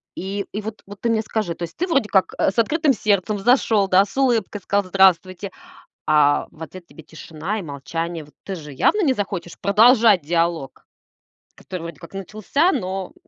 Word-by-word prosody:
И, 195 +2 -4
и 210 - -4
вот, 220 0 -7
вот 200 0 -11
ты 235 - 0
мне 225 -1 +2
скажи, 215 -5 -3
то 170 - -19
есть 170 0 -7
ты 360 - 0
вроде 275 - +1
как, 190 -2 +2
э, - - +3
с 195 - -8
открытым 295 +5 +2
сердцем 210 -1 0
зашёл, 220 -2 +3
да, 190 +1 +5
с 200 - -14
улыбкой 235 -6 +1
сказал 200 0 0
"здравствуйте", 185 0 +2 0.5
а 145 -1 +3
в 160 - -10
ответ 175 +1 -11
тебе 155 +2 -14
тишина 160 +6 -6
и - - -5
молчание. 165 +2 -5
Вот 150 - -19
ты 195 - -5
же 150 -4 -9
явно 275 - +2
не 275 -5 +3
захочешь 195 -6 -5
продолжать 215 -1 +5
диалог, 165 -2 -2 0.7
который 185 -3 -8
вроде 170 -3 -8
как 170 - -13
начался, 215 - 0
но 190 -1 -4
195 Hz, 190 wpm, -21 LUFS, 170-215 Hz, 0.7 s, да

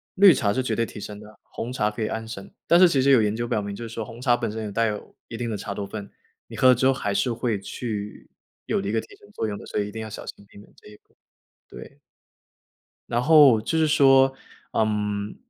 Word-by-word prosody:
绿 195 -2 +8
茶 100 -5 0
是 130 - -1
绝 115 -3 -2
对 115 +1 0
提 - - -12
神 105 0 -8
的， 105 0 -14
红 125 +2 -7
茶 105 -4 0
可 105 - -7
以 110 - 0
安 110 0 -4
神。 105 -4 -9
但 170 - +5
是 185 - +8
其 140 -5 +1
实 140 +1 +4
有 125 -4 +6
研 105 0 0
究 120 +1 -2
表 110 -2 -1
明， 100 0 -6
就 115 +2 -7
是 115 - -11
说 115 - -4
红 120 0 -11
茶 120 -2 +3
本 115 - -3
身 110 +1 -5
也 105 - -5
带 115 +2 +1
有 105 -1 -6
一 115 - -8
定 120 0 -3
的 105 - -3
茶 100 +1 -5
多 100 0 -5
酚， 100 0 -8 0.4
你 - - -10
喝 130 - +5
了 125 - +7
之 130 +2 0
后 135 - +4
还 100 -6 -3
是 120 +4 0
会 115 -3 -2
去 105 0 -6 0.4
有 - - 0
了 100 - -4
一 105 - -2
个 115 - +1
提 - - -15
神 205 - -20
作 - - -3
用 105 -1 -3
的， - - -11
所 - - -6
以 105 0 -2
一 - - -10
定 110 - -6
要 110 - -6
小 105 - -8
心 100 - -10
避 - - -18
免 105 - -16
这 - - -18
一 105 - -13
个， - - -28 0.5
对。 140 - -12 1.1
然 120 +1 0
后 145 -7 +7
就 115 +9 -3
是 160 -1 +3
说， 135 -2 +5 0.4
嗯， 105 -1 -1
110 Hz, 295 characters per minute, -24 LUFS, 105-125 Hz, 1.1 s, 绿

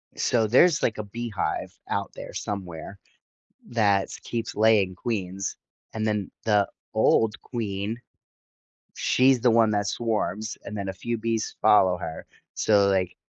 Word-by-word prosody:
So 115 -3 +1
there's 150 +9 +5
like 115 - 0
a 110 - -3
beehive 110 0 -4
out - - -2
there - - -9
somewhere 95 -2 -5 0.7
that’s 100 -4 +1
keeps 115 -1 -4
laying 105 -3 +3
queens, 95 -3 -3 0.4
and 110 0 -2
then 105 -3 -1
the 105 -2 +3 0.3
old 110 -2 +3
queen 110 -1 -4 1.0
she's 130 0 +3
the 120 +1 +4
one 115 -1 +4
that 105 -1 0
swarms 110 -2 -2
and 105 - -6
then 100 -1 -4
a 95 - -2
few 120 +6 -3
bees 115 -1 -2
follow 95 -3 +5
her. 80 -2 -7 0.3
So 100 -2 +3
like 95 -2 0
105 Hz, 140 wpm, -26 LUFS, 100-115 Hz, 1.0 s, there's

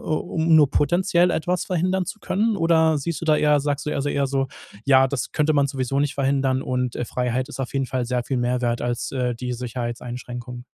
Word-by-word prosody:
um 160 +1 +1
nur 145 -3 +6
potenziell 175 +3 +2
etwas 175 +2 -1
verhindern 185 +1 0
zu 215 - -6
können? 215 +2 0
Oder 160 -2 +3
siehst 160 +2 -3
du - - -4
da 155 -1 +4
eher 150 -1 +3
sagst 145 0 -2
du - - 0
eher 140 - -2
eher 140 -1 +1
so, 135 -1 -1 0.4
ja, 135 -1 +5
das 140 -2 -3
könnte 155 0 +2
man 140 -1 +3
sowieso 135 0 -1
nicht 145 -1 0
verhindern 135 -1 +1
und, 125 -1 -2
äh, 125 - -2
Freiheit 125 +1 -1
ist - - -7
auf 130 - -4
jeden 135 -1 0
Fall 125 0 -2
sehr 125 -1 -1
viel 135 - -2
mehr 125 +1 0
wert 120 0 0
als, 120 +1 -2
äh, 125 -2 -1
die 125 +1 -4
Sicherheitseinschränkung? 120 0 -6
135 Hz, 215 wpm, -23 LUFS, 125-155 Hz, 0.4 s, nur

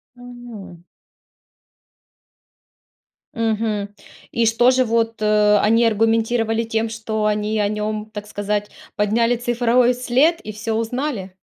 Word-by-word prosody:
Мгм. 240 -8 -11 2.5
Мгм. 220 -3 -1 0.4
И 230 -1 +1
что 240 +3 +4
же 255 0 +2
вот, 225 -1 -1
э, 210 -1 +4
они 230 +2 +3
аргументировали 225 +1 +1
тем, 225 0 -2
что 220 -1 -3
они 210 0 0
о 205 - +2
нём, 215 +1 -3
так 210 -1 -7
сказать, 205 0 -3 0.2
подняли 230 +3 +1
цифровой 240 +1 +2
след 260 +7 +2
и 215 - -7
всё 220 +1 -4
узнали? 230 -4 -3
225 Hz, 115 wpm, -20 LUFS, 210-235 Hz, 2.5 s, что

